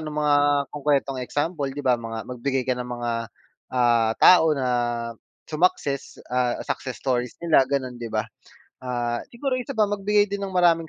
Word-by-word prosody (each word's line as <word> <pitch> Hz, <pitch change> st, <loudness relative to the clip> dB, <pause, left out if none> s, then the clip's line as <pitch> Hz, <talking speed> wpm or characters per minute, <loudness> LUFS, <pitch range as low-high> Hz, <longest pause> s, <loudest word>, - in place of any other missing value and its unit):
ng 150 Hz, -, -5 dB
mga 150 Hz, -1 st, +2 dB, 0.4 s
konkretong 140 Hz, -2 st, 0 dB
example, 145 Hz, +4 st, -2 dB
'di 140 Hz, +2 st, -5 dB
ba. 125 Hz, -2 st, +3 dB
Mga 115 Hz, -1 st, -5 dB
magbigay 130 Hz, +1 st, -2 dB
ka 125 Hz, -1 st, -1 dB
ng 125 Hz, -, -4 dB
mga, 120 Hz, -1 st, -3 dB, 0.6 s
ah, 120 Hz, -2 st, +3 dB
tao 160 Hz, -4 st, +7 dB
na 130 Hz, -3 st, -1 dB, 0.8 s
sumakses, 150 Hz, -4 st, 0 dB
ah, 125 Hz, -1 st, +1 dB
success 130 Hz, -2 st, -4 dB
stories 125 Hz, -2 st, -1 dB
nila, 160 Hz, -5 st, +5 dB
ganon, 130 Hz, -3 st, -2 dB
'di 120 Hz, -, -5 dB
ba? -, -, +1 dB, 0.6 s
Ah, 120 Hz, -1 st, -2 dB
siguro 265 Hz, +3 st, -3 dB
isa 245 Hz, -, -5 dB
pa, 215 Hz, -, +4 dB
magbigay 205 Hz, +1 st, +2 dB
din 200 Hz, 0 st, -3 dB
ng 190 Hz, -, -7 dB
maraming 170 Hz, -3 st, +3 dB
135 Hz, 165 wpm, -24 LUFS, 125-165 Hz, 0.8 s, tao